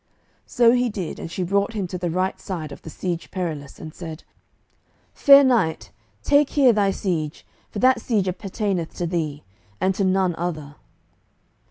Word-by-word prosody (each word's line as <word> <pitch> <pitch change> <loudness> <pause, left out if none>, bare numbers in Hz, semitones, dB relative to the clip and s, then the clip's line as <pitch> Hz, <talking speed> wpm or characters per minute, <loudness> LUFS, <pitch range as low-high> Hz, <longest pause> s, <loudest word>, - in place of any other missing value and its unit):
So 240 -2 +4
he 250 0 +2
did, 195 -6 -5
and 165 - -7
she 185 - -2
brought 200 +4 0
him 205 -3 -2
to 180 - -4
the 175 -1 -2
right 185 +3 -1
side 160 -6 -5
of - - -10
the - - -9
Siege 170 +1 -4
Perilous, 155 -7 -5
and 155 -1 -9
said, 160 -2 -8 0.9
"Fair 280 -1 +7
knight, 235 -12 +1 0.3
take 285 0 +4
here 265 -5 +4
thy 205 -2 +2
siege, 170 -6 -3 0.2
for - - -8
that 255 +1 +3
siege 210 -6 0
appertaineth 185 -1 -3
to 175 - -2
thee, 155 -4 -3 0.4
and 190 +1 +1
to 195 - -1
none 190 -1 +2
other." 155 -4 -4
185 Hz, 170 wpm, -23 LUFS, 165-210 Hz, 0.9 s, Fair